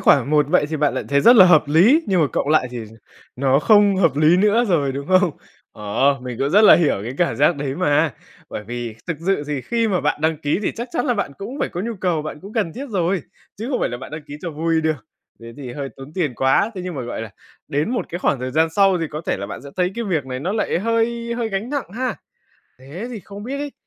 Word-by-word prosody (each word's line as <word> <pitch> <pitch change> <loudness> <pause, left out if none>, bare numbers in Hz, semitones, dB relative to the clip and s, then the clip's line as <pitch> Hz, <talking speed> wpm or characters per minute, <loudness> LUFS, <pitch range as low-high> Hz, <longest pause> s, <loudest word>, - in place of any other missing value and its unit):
khoản 140 0 +4
một 150 -2 +3
vậy 155 -3 +3
thì 155 - -2
bạn 145 -1 +1
lại - - -3
thấy 140 0 +3
rất 240 - +7
là 190 - +10
hợp 160 -4 +6
lý, 200 - +5
nhưng 185 -4 +2
mà 150 - +4
cộng 140 - -1
lại 150 -5 +3
thì 120 -3 -6 0.5
nó 135 +1 +3
không 205 +1 +4
hợp 165 -7 +2
lý 155 +4 +5
nữa 210 +5 +3
rồi, 145 -7 +1
đúng 140 +2 -5
không? 185 -2 +4 0.4
Ờ, 125 +7 0
mình 125 -2 -6
cũng 140 +1 0
rất 210 +5 +5
là - - +9
hiểu 165 -4 +2
cái 120 - -4
cảm 170 -10 +1
giác 145 +3 +3
đấy 140 -1 -3
mà, 155 -3 +1 0.4
bởi 105 - -6
vì 120 0 -5
thực 165 - -2
sự 195 -6 +1
thì 145 -2 -2
khi 230 - 0
mà 185 -3 +1
bạn 150 0 -1
đăng 160 0 +1
ký 145 +3 0
thì - - -1
chắc 235 +2 -5
chắn 245 - -1
là 245 - +2
bạn 200 -9 -2
cũng 245 +8 -7
phải - - 0
có 175 - -5
nhu 230 +3 -3
cầu, 170 -4 0
bạn 150 0 -7
cũng 200 +3 -11
cần 205 -8 -1
thiết 275 - -6
rồi, 180 -2 0 0.4
chứ 230 +4 -4
không 255 - -1
phải - - +1
là 120 - -5
bạn 130 - -10
đăng 155 +1 -7
ký 145 - -8
cho 170 - -3
vui 160 +1 0
được 155 -8 -2 0.3
thế 115 0 -10
thì 130 -4 -7
hơi 140 +1 -5
tốn 135 +3 -11
tiền 155 -9 -1
quá. 135 - +2
Thế 185 - -5
nhưng 180 - -5
mà, 130 - -4
gọi 120 -1 -5
là, 110 - -8 0.4
đến 150 +10 -1
một 245 - -2
cái 175 - -5
khoảng 140 -7 0
thời 130 - -3
gian 160 +4 +2
sau 195 0 +3
thì 165 - -2
có 155 +1 -5
thể - - 0
là 100 - -5
bạn - - -8
sẽ 140 - -10
thấy 180 +1 +1
cái 235 - -3
việc 160 -9 -1
này 130 0 -5
nó 185 +6 -2
lại 215 -5 0
hơi 230 +3 -1
hơi 235 -2 -2
gánh 210 +5 -3
nặng 285 -10 -3
ha? 255 -1 -1 0.6
Thế 145 - -8
thì 225 -5 -6
không 200 +2 -10
biết 270 +4 -4
ấy, 290 -1 -5
165 Hz, 275 wpm, -21 LUFS, 140-205 Hz, 0.6 s, là